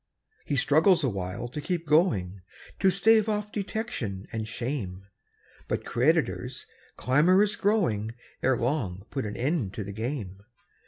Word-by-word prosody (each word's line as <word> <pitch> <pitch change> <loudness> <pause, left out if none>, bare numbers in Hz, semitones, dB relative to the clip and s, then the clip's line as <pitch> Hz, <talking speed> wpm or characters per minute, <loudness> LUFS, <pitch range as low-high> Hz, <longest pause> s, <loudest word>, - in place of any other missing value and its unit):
He 145 - -1
struggles 160 +6 +4
awhile 100 -2 -2
to 150 +5 -5
keep 170 +1 -2
going, 110 - +2 0.4
To 195 - +5
stave 220 +3 +4
off 210 0 -2
detection 195 - -4
and 110 -1 -3
shame; 110 -6 -4 0.6
But - - -2
creditors, - - 0 0.3
clamorous 180 +10 +4
growing, 115 - +1 0.3
Ere 130 -1 +2
long 115 -8 -2
put 135 -6 -2
an 105 - -6
end 130 - -1
to 105 - -3
the 100 +1 -7
game. 110 -4 -4
130 Hz, 130 wpm, -27 LUFS, -, 0.6 s, To